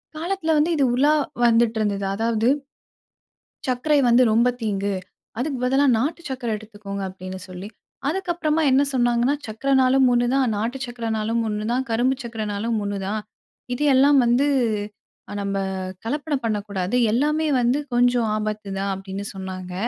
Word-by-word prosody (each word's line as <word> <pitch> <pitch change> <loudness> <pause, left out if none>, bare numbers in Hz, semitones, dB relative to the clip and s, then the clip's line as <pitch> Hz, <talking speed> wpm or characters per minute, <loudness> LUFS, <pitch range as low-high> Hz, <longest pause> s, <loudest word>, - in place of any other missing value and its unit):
காலத்தில 330 0 -1
வந்து 315 +3 +2
இது 280 - +2
உலா 285 +4 +4 0.3
வந்திட்டிருந்தது. 220 -4 +2
அதாவது, 225 +1 0 1.2
"சக்கரை 270 +4 +2
வந்து 240 +2 +6
ரொம்ப 235 +3 +4
தீங்கு. 200 -2 -1 0.5
அதுக்கு 275 0 -2
பதிலா 270 +3 +3
நாட்டு 300 +8 -1
சக்கரை 250 -3 -3
எடுத்துக்கோங்க." 205 -2 -8
அப்படின்னு 185 0 -8
சொல்லி. 185 +2 -8 0.4
அதற்கப்புறமா 340 -3 0
என்ன 270 +2 +5
சொன்னாங்கன்னா 240 +2 +2
"சக்கரன்னாலும் 265 +3 +3
ஒண்ணுதான், 250 +2 +2
நாட்டு 240 +5 -2
சக்கரைன்னாலும் 230 -1 -2
ஒண்ணுதான், 230 +5 -1
கரும்பு 250 +3 +1
சக்கரைன்னாலும் 220 0 -3
ஒண்ணுதான். 200 +1 -3 0.5
இது 295 - -2
எல்லாம் 280 +1 +5
வந்து 245 +5 +3 0.8
அ - - -5
நம்ப 200 0 -2 0.5
கலப்படம் 290 0 -2
பண்ணக்கூடாது. 205 -1 -2 0.2
எல்லாமே 300 +5 +1
வந்து 245 +4 +2 0.2
கொஞ்சம் 245 -2 +3
ஆபத்து 215 -1 -4
தான்" 195 0 -1
அப்பிடின்னு 195 +1 -6
சொன்னாங்க. 185 -1 -6
235 Hz, 125 wpm, -23 LUFS, 210-270 Hz, 1.2 s, வந்து